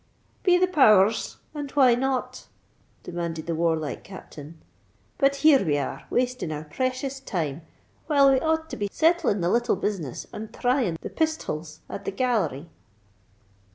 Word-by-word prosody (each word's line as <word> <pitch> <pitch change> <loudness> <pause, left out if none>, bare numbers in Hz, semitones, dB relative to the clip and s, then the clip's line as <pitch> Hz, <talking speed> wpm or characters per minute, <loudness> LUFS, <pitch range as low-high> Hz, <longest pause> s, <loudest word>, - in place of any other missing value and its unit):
"Be 360 -2 +4
the 365 - +4
power 240 - +6
rs! 225 - -5 0.2
and 290 -2 -5
why 260 -4 +5
not?" 260 +1 -2 0.6
demanded 170 -2 -4
the 170 - -2
warlike 160 -3 -1
Captain. 160 -4 -11 0.6
"But 275 0 +3
here 285 -6 +7
we 150 -5 +1
are, 140 - -4
wasting 250 -8 -1
our 150 0 -4
precious 255 - -3
time, 165 - -3 0.5
while 280 -3 +5
we 265 - +3
ought 320 +2 0
to - - -5
be 205 -1 -2
settling 325 - +2
the 170 - +1
little 240 -1 +2
business 185 - -3
and 215 0 -7
thrying 245 -9 0
the - - -7
pisthols 170 - -3
at 200 - -7
the - - -2
Gallery." 195 - -1
220 Hz, 155 wpm, -25 LUFS, 165-270 Hz, 0.6 s, here